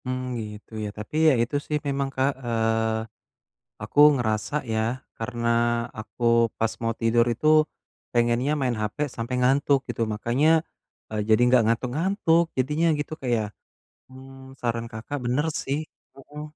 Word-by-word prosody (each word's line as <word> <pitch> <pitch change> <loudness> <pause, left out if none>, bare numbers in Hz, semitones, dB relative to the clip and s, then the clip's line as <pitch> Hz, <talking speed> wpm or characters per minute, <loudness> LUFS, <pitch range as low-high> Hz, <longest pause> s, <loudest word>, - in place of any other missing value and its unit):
Mmm, 130 0 -2 0.3
gitu 105 +2 -14
ya, - - -3
tapi 105 +7 -8
ya - - +5
itu 125 +5 -4
sih 150 - 0
memang 140 -1 -1
Kak, 135 +2 +2
eee, 110 -1 0 0.8
aku - - -6 0.2
ngerasa 110 -1 -1 0.2
ya, 110 - +1 0.4
karena 120 0 -4 0.5
aku 110 +2 -6 0.3
pas 115 0 +1
mau 115 0 +1
tidur 115 +1 +3
itu 120 +6 -4 0.7
pengennya 120 +4 +2
main 125 -3 0
HP 105 0 -3 0.2
sampai 115 +2 -3
ngantuk 135 +2 +3
gitu, - - -2
makanya 120 +8 +1 0.6
e - - -6
jadi 110 +1 +4
enggak 125 -1 +5
ngantuk-ngantuk. 160 - +2
Jadinya 150 +6 +1
gitu 145 - -4
Kak 130 - -3
ya, 110 - 0 0.7
mmm 130 0 -13
saran 115 -1 -2
Kakak 115 +6 -5
benar 130 +6 +1 0.2
sih, 140 +2 -1 0.4
heeh. 145 +2 -10
125 Hz, 145 wpm, -25 LUFS, 115-140 Hz, 0.8 s, ya